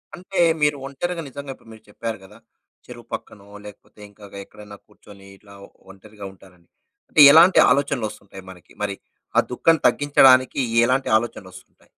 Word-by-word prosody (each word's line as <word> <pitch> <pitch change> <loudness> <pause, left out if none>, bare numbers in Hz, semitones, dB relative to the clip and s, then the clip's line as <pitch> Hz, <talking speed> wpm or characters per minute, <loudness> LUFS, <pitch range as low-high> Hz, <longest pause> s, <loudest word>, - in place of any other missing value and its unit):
అంటే 185 +2 -7 0.2
మీరు 150 -1 +1
ఒంటరిగా 165 +6 -5
నిజంగా 140 0 -9
ఇప్పుడు 115 - -22
మీరు 110 0 -18
చెప్పారు 115 +1 -7
కదా! 95 - -17 0.5
చెరువు - - -13
పక్కనో 100 -1 -9 0.2
లేకపోతే 105 +1 -16
ఇంకా 105 0 -17
గ - - -12
ఎక్కడైనా 105 -1 -15
కూర్చొని 100 -1 -19
ఇలా 100 -1 -19 0.4
ఒంటరిగా 105 +1 -14
ఉంటానని. 90 -3 -23 0.4
అంటే 150 - +3
ఎలాంటి 170 +4 +5
ఆలోచనలొస్తుంటాయి 115 -8 -3
మనకి? 90 -2 -16
మరి 100 -1 -4 0.4
ఆ - - +5
దుఃఖం 165 +5 +2
తగ్గించడానికి 135 -2 +3 0.3
ఎలాంటి 130 +1 -1
ఆలోచనలొస్తుంటాయి? 100 -5 -12
110 Hz, 140 wpm, -20 LUFS, 100-140 Hz, 0.5 s, ఎలాంటి